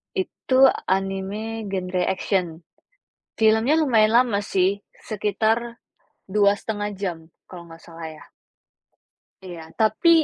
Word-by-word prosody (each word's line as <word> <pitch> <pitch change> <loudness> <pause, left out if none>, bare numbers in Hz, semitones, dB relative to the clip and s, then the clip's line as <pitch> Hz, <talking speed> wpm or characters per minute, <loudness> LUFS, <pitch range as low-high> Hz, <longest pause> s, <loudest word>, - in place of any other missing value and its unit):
Itu 270 -8 +3 0.2
anime 195 +3 -2
genre 185 -1 -2
action. 180 -4 -1 0.8
Film-nya 220 +8 +4
lumayan 225 -8 +3
lama 235 -4 +3
sih 195 0 0 0.2
sekitar 220 +3 -1 0.5
2.5 205 +1 0
jam, 185 -4 -3 0.3
kalau 175 -2 -11
enggak 165 0 -13
salah 165 -1 -9
ya. 155 - -12 1.2
Iya, 170 -4 -9
tapi 220 +10 +3
205 Hz, 100 wpm, -23 LUFS, 185-225 Hz, 1.2 s, Film-nya